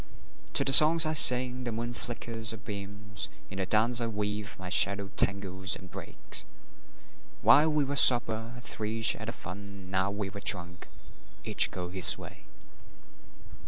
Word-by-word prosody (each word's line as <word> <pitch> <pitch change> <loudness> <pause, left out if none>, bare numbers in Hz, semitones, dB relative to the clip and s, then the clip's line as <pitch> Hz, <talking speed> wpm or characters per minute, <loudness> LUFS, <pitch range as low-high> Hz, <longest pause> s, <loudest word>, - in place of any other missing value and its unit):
To - - +1
the 135 - +2
songs 160 +3 +8
I 155 - -3
sing 125 -3 +4
the 120 - -6
moon 120 +2 -7
flickers 115 -1 -5
her 110 - -3
beams; 105 -1 -7 0.2
In 95 - -9
the 95 - -5
dance 115 +4 -1
I 115 - -4
weave 105 -1 -7
my 90 -1 -10
shadow 100 +1 +2
tangles 95 -1 +2
and 95 -1 -15
breaks. - - -8 1.0
While 155 +2 +3
we 150 -1 -1
were 140 +1 -6
sober, 115 -3 +4
three 110 0 -7
shared 110 -1 +1
the - - -5
fun; 100 -2 -12
Now 95 +1 -2
we 100 -1 -7
are 100 - -11
drunk, 90 -2 +1 0.6
each - - +1
goes 90 -1 -9
his 95 -2 0
way. - - -15
105 Hz, 160 wpm, -26 LUFS, 100-120 Hz, 1.0 s, songs